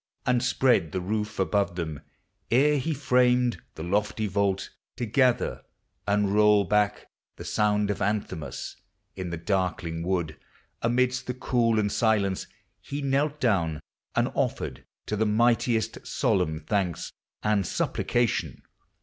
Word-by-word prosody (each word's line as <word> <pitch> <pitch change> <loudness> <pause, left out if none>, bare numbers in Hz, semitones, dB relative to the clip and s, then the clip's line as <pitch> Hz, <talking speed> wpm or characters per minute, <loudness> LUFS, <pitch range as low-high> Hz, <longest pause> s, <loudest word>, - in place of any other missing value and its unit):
And 125 -1 +2
spread 125 - +2
the - - 0
roof 105 +3 -3
above 100 -1 +1
them,— 80 -4 -4 0.5
ere 145 +4 +4
he 160 +5 -2
framed 125 -3 +2
The 80 - -6
lofty 105 +4 0
vault, 100 -1 0 0.2
to 120 - -3
gather 125 +2 +2 0.5
and 100 -1 +2
roll 105 -1 +5
back 105 +2 +1 0.3
The - - -9
sound 105 -1 +1
of 100 - -4
anthems; 100 -5 -3 0.4
in 95 -2 -4
the 85 - -4
darkling 90 -2 -1
w 85 -2 0 0.5
I, - - +1
Amidst 125 +1 +1
the 125 - -2
cool 120 -3 +1
and 105 -1 +1
silence, 100 -4 +1 0.4
lie 145 +1 -2
knelt 140 +2 0
down. 85 -10 +1 0.4
And - - +2
offered - - -2 0.2
to 105 - -2
the 110 +1 +1
Mightiest 115 0 +1
solemn 80 0 0
thanks 90 -1 -1 0.3
And 105 -2 +2
supplication. 120 -2 -1
105 Hz, 135 wpm, -27 LUFS, 95-120 Hz, 0.5 s, roll